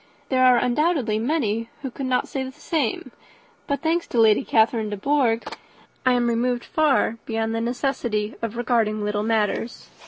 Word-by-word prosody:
There 255 -1 +2
are, 250 -1 +6
undoubtedly, 250 -3 +1
many 230 -4 -1
who 265 - -4
could 265 +2 -5
not 255 -1 0
say 270 - -4
the 260 - -6
same; 280 -4 -2 0.6
but, 280 -2 -1
thanks 335 +2 0
to 240 - -1
Lady 220 +2 +5
Catherine 220 -2 +2
de 205 - -4
Bourgh, 245 -1 +1 0.6
I 255 - +5
am 245 -1 +2
removed 240 +1 0
far 285 -7 +1
beyond 225 0 -1
the 225 - -1
necessity 240 -3 -2
of 230 0 -4
regarding 225 -3 0
little 210 0 -1
matters." 220 +1 -1
240 Hz, 165 wpm, -23 LUFS, 225-265 Hz, 0.6 s, are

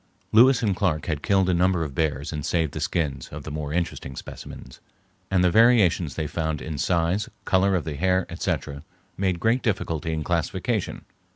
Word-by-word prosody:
Lewis 125 +3 +6
and 100 -4 +1
Clark 90 -6 0
had 75 -4 -2
killed 95 +1 +2
a 95 - +2
number 90 -1 +2
of 75 -4 -5
bears 75 -1 -1
and 75 -1 -4
saved 80 -2 0
the - - -4
skins 70 -6 -2
of 75 0 -8
the 75 - -7
more 75 -1 -4
interesting 80 -5 -3
specimens, 65 - -10 0.5
and 95 -2 +2
the 90 - +4
variations 105 - +4
they 80 - -2
found 80 -1 -2
in 75 -2 -5
size, 90 +3 +1 0.2
color 95 +1 +3
of 90 - 0
the 80 -2 -4
hair, 95 +2 +2
etc., 70 0 -3 0.3
made 95 -3 0
great 115 +5 +2
difficulty 85 - -1
in 80 -1 -2
classification. 85 0 -2
85 Hz, 185 wpm, -25 LUFS, 75-95 Hz, 0.5 s, Lewis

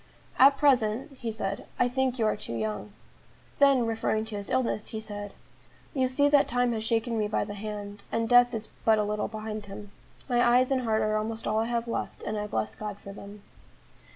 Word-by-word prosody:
"At 275 +1 +7
present," 265 -1 +2
he 230 -2 -3
said, 200 -2 -4
"I - - +3
think 260 0 0
you 225 - +1
are 215 - +2
too 115 - -6
young." 105 -2 -3 0.7
Then, 275 -4 +5
referring 220 -1 0
to 220 -1 -6
his 200 -1 -5
illness, 255 -4 0
he 220 - -4
said: 205 -2 -6 0.6
"You 260 -2 +2
see 285 +3 +3
that 285 -1 +5
time 245 0 +1
has 220 -1 -3
shaken 230 0 0
me 210 - +1
by 210 - 0
the 205 - -6
hand; 205 -1 -6
and 230 0 0
death 245 +1 +6
is 220 0 -5
but 220 -1 +5
a 210 - +2
little 210 0 -1
behind 215 -1 -6
him. 200 +1 -9 0.4
My 240 -2 +2
eyes 250 +2 +4
and 260 -1 +2
heart 220 -3 +1
are 215 0 +1
almost 220 +1 -3
all 215 +1 +1
I 225 - +1
have 235 0 -2
left, 230 - -4
and 215 - -3
I 210 0 -2
bless 110 - -2
God 205 - -6
for 200 -1 -10
them." 200 0 -11
220 Hz, 215 wpm, -28 LUFS, 210-245 Hz, 0.7 s, At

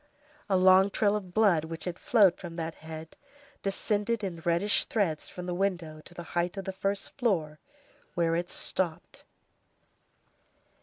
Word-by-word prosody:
A 190 - +4
long 185 +1 +6
trail 205 +1 +2
of 190 -4 -5
blood 185 -6 +3
which 165 0 -6
had 180 -1 -4
flowed 205 -7 +5
from 170 -3 -8
that 165 -1 -3
head, 160 0 -9 0.5
descended 210 +3 -1
in 170 -4 -4
reddish 175 +5 +3
threads 180 -9 -1
from 180 - -7
the 180 - -2
window 175 -5 -2
to 175 - -12
the 175 - -6
height 175 +2 0
of 195 - -4
the 190 - -3
first 195 +1 -2
floor, 165 - 0 0.6
where 165 -1 +2
it 175 +1 -2
stopped. 175 -2 -3
180 Hz, 155 wpm, -29 LUFS, 165-200 Hz, 0.6 s, long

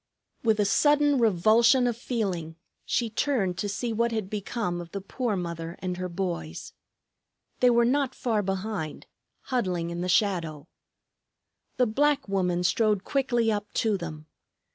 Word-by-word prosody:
With 220 -2 +2
a 205 - +3
sudden 290 +5 +3
revulsion 230 +4 +4
of 240 -2 +1
feeling 195 -10 -3 0.3
she 235 - 0
turned 215 -6 0
to 205 - -1
see 230 +4 -2
what 235 +2 +1
had 215 -4 -3
become 205 -3 -3
of 170 -1 -11
the 200 - -2
poor 220 +3 -2
mother 170 -2 -4
and 180 -1 -4
her 185 0 -3
boys. 170 - -4 0.9
They 250 - +5
were 235 -1 +4
not 265 +1 +1
far 225 -4 0
behind, 195 -4 -4 0.4
huddling 180 -10 -1
in 170 0 -4
the 180 - -2
shadow. 170 -6 +1 1.1
The 250 - +4
black 285 +4 +1
woman 180 -3 0
strode 210 +1 +2
quickly 240 -5 +1
up 210 -1 -3
to 220 -2 +1
them. 155 -4 -6
205 Hz, 150 wpm, -27 LUFS, 180-235 Hz, 1.1 s, They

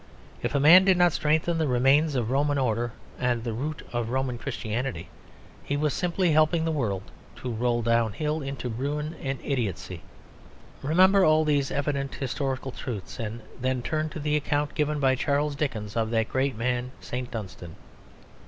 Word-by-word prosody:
If - - -2
a - - +4
man 165 +6 +8
did 190 -1 +4
not 175 -2 +4
strengthen 160 +2 +1
the 160 - +1
remains 135 +4 +3
of 120 -2 0
Roman 145 +1 +2
order 120 -2 0 0.3
and 120 -2 0
the 115 -2 -3
root 150 +7 -4
of 120 -1 -1
Roman 130 -1 -1
Christianity, 115 -7 -4 0.5
he 145 - -1
was 150 -1 +1
simply 180 0 +1
helping 155 +2 +3
the 165 - +1
world 105 -11 -1 0.3
to 125 - -5
roll 120 +1 0
downhill 115 +7 +1
into 135 -2 -4
ruin 145 +7 -3
and 135 -1 -2
idiotcy. 100 - -2 0.8
Remember 185 +7 +5
all 155 -1 +4
these 145 -3 +2
evident 140 -1 -2
historical 135 0 -3
truths 105 -8 -6
and 115 0 -4 0.2
then 130 -1 0
turn 155 +2 -1
to 155 - -7
the 150 0 0
account 145 0 0
given 150 0 0
by 135 -2 +3
Charles 145 +2 0
Dickens 115 -8 -3
of 115 -1 0
that 110 -1 0
great 130 -1 0
man, 125 +2 -1
St. 125 0 -5
Dunstan. 90 -6 -7
135 Hz, 170 wpm, -26 LUFS, 120-150 Hz, 0.8 s, man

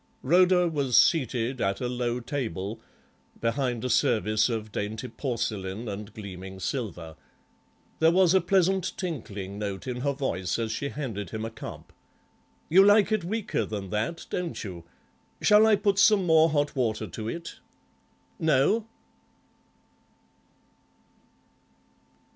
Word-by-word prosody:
Rhoda 180 +4 +4
was 140 -6 +1
seated 130 -4 +2
at 95 0 0
a 125 - -2
low 120 0 -2
table, 115 - -4 0.6
behind 120 0 -1
a - - -1
service 110 +1 +2
of 110 -2 -4
dainty 110 +4 -4
porcelain 110 -5 -3
and 105 +1 -6
gleaming 95 -2 -8
silver. 95 - -4 0.8
There 160 - +5
was 180 0 +4
a 190 - +5
pleasant 190 -1 +1
tinkling 105 - -5
note 100 -2 -4
in 125 -2 -4
her 140 +3 -1
voice 95 -10 -2
as 115 -1 -2
she 140 +5 -3
handed 110 - -5
him 110 0 -4
a 115 - -5
cup. - - -10 0.7
"You 190 +4 +6
like 205 +1 +5
it 215 -4 +1
weaker 215 +5 -2
than 100 -3 -5
that, 110 +10 -2
don't 175 -2 -3
you? 90 -5 -8 0.5
Shall 215 +1 +6
I 220 - +6
put 200 0 +1
some 205 -2 +5
more 160 -1 +5
hot 145 -1 0
water 110 -4 -1
to 110 +4 -6
it? 170 +6 -7 0.8
No?" 160 +8 +2
125 Hz, 130 wpm, -27 LUFS, 105-170 Hz, 0.8 s, You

